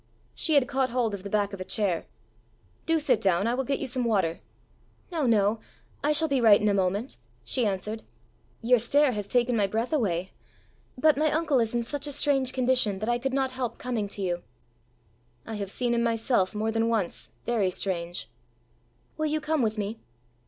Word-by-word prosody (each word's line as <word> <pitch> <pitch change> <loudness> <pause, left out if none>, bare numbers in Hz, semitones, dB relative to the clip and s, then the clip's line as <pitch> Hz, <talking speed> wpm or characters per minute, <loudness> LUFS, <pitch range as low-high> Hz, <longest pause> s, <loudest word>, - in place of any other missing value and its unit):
She 315 - 0
had 275 -3 +4
caught 265 -1 0
hold 235 -3 0
of 200 - -5
the 200 - -7
back 205 -1 0
of 195 - -6
a - - -1
chair. 190 -2 -1 0.8
"Do 325 0 +3
sit 255 -7 +2
down. 190 0 +2
I 235 - +1
will 265 +2 0
get 275 +1 -1
you - - -3
some 255 -1 -2
water." 190 -8 +1 0.7
"No, 315 -6 0
no; 215 -1 +3 0.4
I 295 - +3
shall 310 +2 +3
be 275 -4 +1
right 215 -3 +7
in 210 - +1
a - - +2
moment!" 200 +5 -1 0.3
she 235 - 0
answered. 210 +3 -3 0.6
"Your 245 +1 +5
stair 280 +5 +3
has 205 -3 -4
taken 245 +1 +2
my 205 -3 +2
breath 225 +8 -2
away. 190 - 0 0.7
But 305 +3 +4
my 310 0 +3
uncle 310 -4 +2
is 230 0 0
in 235 - +1
such 285 +4 -4
a - - -4
strange 275 -2 +2
condition 250 -6 +2
that 215 +4 -3
I 240 0 +1
could 270 +2 -2
not 265 -1 0
help 255 -2 -4
coming 235 -5 -2
to 200 0 -5
you." 175 -1 -1 1.0
"I 225 - -6
have 200 -2 -4
seen 240 +3 -1
him 235 - +1
myself, 225 -4 +1
more 220 +1 0
than 225 +1 +1
once, 195 - -1 0.2
very 220 -6 +1
strange." 175 - -3 0.9
"Will 310 0 0
you 310 +1 0
come 305 -1 0
with 220 -1 0
me?" 210 +2 -3
230 Hz, 200 wpm, -27 LUFS, 200-265 Hz, 1.0 s, right